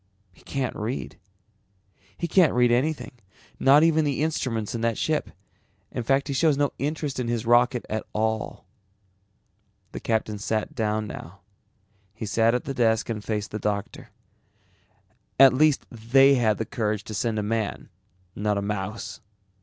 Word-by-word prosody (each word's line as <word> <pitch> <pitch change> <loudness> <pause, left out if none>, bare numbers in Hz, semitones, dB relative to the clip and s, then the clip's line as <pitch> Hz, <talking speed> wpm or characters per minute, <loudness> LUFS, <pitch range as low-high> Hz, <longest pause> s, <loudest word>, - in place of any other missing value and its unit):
He - - -22
can't 135 -2 -3
read. 105 - -5 1.0
He 170 - -2
can't 170 -2 +4
read 125 -1 +4
anything, 145 +6 0 0.5
not 140 +3 +6
even 160 -1 +4
the 145 0 0
instruments 120 -9 -2
in 115 - -3
that 115 -1 0
ship. 155 -1 -1 0.6
In - - -3
fact 135 +4 +1
he 140 - -2
shows 150 +1 +3
no 145 0 +1
interest 145 -1 -2
in 125 - -2
his 120 -1 -2
rocket 120 +1 +3
at 110 0 -3
all." 110 0 -2 1.3
The - - -6
captain 110 -2 -1
sat 110 +1 -2
down 110 -2 -1
now. 95 -2 -9 0.7
He 110 - -5
sat 115 +3 +2
at 125 - -1
the 135 - -4
desk 115 -3 +1
and 105 -2 -3
faced 105 -2 -3
the 105 - -4
doctor. 100 -1 -3 1.3
"At 135 -1 +9
least 150 +1 +3
they 130 +5 +4
had 110 -5 +2
the 110 - -2
courage 105 -5 -2
to 110 - -8
send 110 +1 -1
a 105 - -1
man, 110 0 -2 0.5
not 105 0 0
a - - -1
mouse. 105 +4 -4
115 Hz, 160 wpm, -25 LUFS, 105-135 Hz, 1.3 s, At